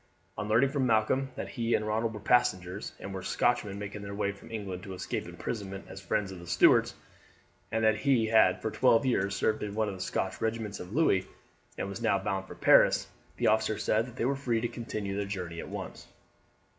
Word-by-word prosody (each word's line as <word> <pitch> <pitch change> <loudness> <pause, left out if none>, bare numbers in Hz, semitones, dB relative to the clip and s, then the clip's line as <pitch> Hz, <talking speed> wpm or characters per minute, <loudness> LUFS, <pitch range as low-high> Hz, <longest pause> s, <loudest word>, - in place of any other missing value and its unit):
On 105 - -4
learning 120 +6 +3
from 135 -3 +1
Malcolm 120 +4 +2
that - - -5
he 115 -1 0
and 105 - -1
Ronald 110 +1 -1
were - - -6
passengers, 95 -5 +1
and 95 - -7
were 95 - -4
Scotsmen 105 -2 0
making 100 0 -6
their 100 0 -6
way 100 -1 0
from 100 - -14
England 100 -5 -5
to 95 0 -7
escape - - -4
imprisonment 95 -4 -5
as 95 0 -9
friends 100 0 -1
of 95 - -8
the 85 - -11
Stuarts, 85 0 +4 0.8
and 110 0 0
that 110 -1 +4
he 130 -1 +2
had 110 -5 +4
for 110 - -1
twelve 125 +1 +4
years 100 -6 +1
served 110 +1 0
in 105 -1 -4
one 110 0 +1
of - - -4
the 95 - -8
Scotch 95 +1 -2
regiments 110 -2 -2
of 90 +1 -8
Louis, 105 - +2 0.5
and - - -2
was 100 -1 -6
now 100 - +3
bound 95 -1 -3
for - - -9
Paris, - - +5 0.3
the - - -1
officer 110 0 +2
said 110 +3 +1
that 125 - -12
they 120 - -1
were 140 +2 +1
free 125 -4 0
to 120 - -1
continue 110 -4 -4
their 100 0 -1
journey 90 -4 -5
at - - -7
once. - - -7
105 Hz, 220 wpm, -30 LUFS, 95-115 Hz, 0.8 s, Paris